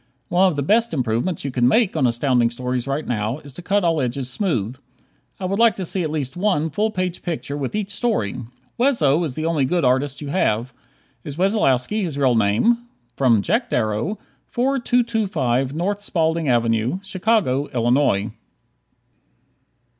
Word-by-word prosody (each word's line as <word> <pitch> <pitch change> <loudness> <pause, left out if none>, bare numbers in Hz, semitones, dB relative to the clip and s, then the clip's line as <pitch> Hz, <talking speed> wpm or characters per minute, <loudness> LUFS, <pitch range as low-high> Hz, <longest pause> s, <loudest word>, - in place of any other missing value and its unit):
One 185 +2 +4
of 180 - 0
the 140 - -1
best 225 - +2
improvements 125 +6 -1
you 140 - -2
could 125 -1 -1
make 180 - +3
on 140 -5 +3
Astounding 120 0 +2
Stories 125 +1 -3
right 140 +3 -2
now 110 +1 -1
is 145 -3 -12
to 175 - -9
cut 200 +2 +1
all 165 -3 +2
edges 125 +1 -2
smooth. 125 - -1 0.6
I 190 - -4
would 195 +3 -1
like 230 -2 +5
to 190 - -4
see 185 +2 0
at 160 - -1
least 150 -2 -3
one 180 -5 0
full 210 +8 0
page 185 -4 -3
picture 160 -5 -4
with 145 +5 -3
each 205 -2 -2
story. 205 - -1 0.4
Wesso 175 - +3
is 145 -6 -3
the 155 - -3
only 165 -4 +1
good 170 +3 +1
artist 130 +2 +1
you 145 - -6
have. 125 - 0 0.5
Is 145 -2 -7
Wessolowski 195 - +1
his 165 -7 -3
real 135 -3 +3
name? 115 - +3 0.6
Jack 225 - 0
Darrow, 110 - -1 0.3
4225 220 - 0
N. 200 +4 0
Spaulding 165 -6 0
Avenue, 115 +4 +1
Chicago, 190 - +1
Illinois. 120 -4 +1
150 Hz, 160 wpm, -21 LUFS, 125-195 Hz, 0.6 s, like